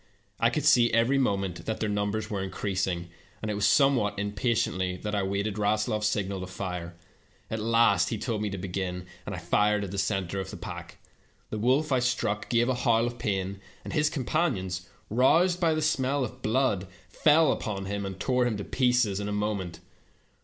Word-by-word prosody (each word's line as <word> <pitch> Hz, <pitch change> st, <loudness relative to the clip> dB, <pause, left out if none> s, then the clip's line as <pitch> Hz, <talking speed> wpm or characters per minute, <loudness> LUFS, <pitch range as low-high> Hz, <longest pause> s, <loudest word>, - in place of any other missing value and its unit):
I -, -, +4 dB
could -, -, -2 dB
see 120 Hz, -1 st, +5 dB
every 115 Hz, +4 st, +3 dB
moment 95 Hz, -7 st, -1 dB
that 110 Hz, -, -2 dB
their 110 Hz, -, 0 dB
numbers 105 Hz, +1 st, -1 dB
were 100 Hz, -3 st, -3 dB
increasing, 95 Hz, -2 st, -2 dB, 0.3 s
and 110 Hz, -, -3 dB
it -, -, -1 dB
was 100 Hz, 0 st, +2 dB
somewhat 130 Hz, -5 st, +3 dB
impatiently 100 Hz, -3 st, 0 dB
that 105 Hz, +3 st, -5 dB
I 100 Hz, -, +1 dB
waited 100 Hz, +2 st, -2 dB
RaslofPs 105 Hz, +1 st, +1 dB
signal 100 Hz, -2 st, -1 dB
to 95 Hz, -, -5 dB
fire. 90 Hz, -2 st, -5 dB, 0.6 s
At 110 Hz, -, -2 dB
last 110 Hz, -4 st, +3 dB
he 115 Hz, -, -2 dB
told 110 Hz, 0 st, -2 dB
me 105 Hz, -, -1 dB
to 95 Hz, -, -5 dB
begin, 90 Hz, -1 st, -4 dB, 0.2 s
and 100 Hz, -, -3 dB
I -, -, -6 dB
fired 105 Hz, +4 st, +2 dB
at 95 Hz, -, -5 dB
the 100 Hz, -, -2 dB
center 95 Hz, -2 st, -1 dB
of 95 Hz, 0 st, -4 dB
the -, -, -7 dB
pack. -, -, -8 dB, 0.5 s
The 110 Hz, -, -3 dB
wolf 135 Hz, +7 st, +2 dB
I 130 Hz, -, +4 dB
struck 115 Hz, -4 st, -1 dB
gave 120 Hz, 0 st, +3 dB
a 130 Hz, -, +2 dB
howl 115 Hz, -2 st, +2 dB
of 120 Hz, 0 st, -4 dB
pain, 95 Hz, -1 st, -2 dB, 0.2 s
and -, -, -6 dB
his 150 Hz, -1 st, +3 dB
companions, 115 Hz, -, -1 dB, 0.2 s
roused 165 Hz, +10 st, +4 dB
by 165 Hz, -3 st, +2 dB
the 155 Hz, -, -1 dB
smell 140 Hz, -2 st, +1 dB
of 125 Hz, +2 st, -6 dB
blood, 110 Hz, -5 st, +1 dB, 0.2 s
fell 155 Hz, -1 st, +4 dB
upon 100 Hz, -3 st, -3 dB
and 100 Hz, -1 st, -4 dB
tore 125 Hz, +2 st, +2 dB
him 110 Hz, -4 st, -1 dB
to 100 Hz, -, -4 dB
pieces 125 Hz, -6 st, +2 dB
in 100 Hz, 0 st, -3 dB
a -, -, -3 dB
moment. 100 Hz, -5 st, -2 dB
105 Hz, 195 wpm, -28 LUFS, 95-120 Hz, 0.6 s, see